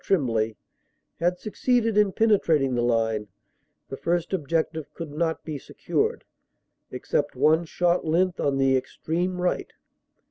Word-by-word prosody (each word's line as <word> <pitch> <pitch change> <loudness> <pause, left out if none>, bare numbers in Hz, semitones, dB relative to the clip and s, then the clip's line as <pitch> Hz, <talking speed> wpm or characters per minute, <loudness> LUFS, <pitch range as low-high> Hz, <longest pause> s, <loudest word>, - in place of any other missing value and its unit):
Tremblay) 115 - +1 0.6
had 175 +1 +1
succeeded 230 +2 0
in 210 -2 +4
penetrating 165 - +2
the 120 - +1
line, 115 -3 +1 0.6
the 135 - -6
first 175 +1 -1
objective 160 -2 -1
could 165 -3 -6
not 160 +2 -1
be 155 -3 -4
secured, - - -2 0.7
except - - -2
one 160 +2 +3
short 175 +2 +1
length 175 +3 +1
on 140 -1 +1
the 135 -1 +3
extreme 170 +7 -2
right. 180 0 -1
160 Hz, 130 wpm, -25 LUFS, 135-180 Hz, 0.7 s, in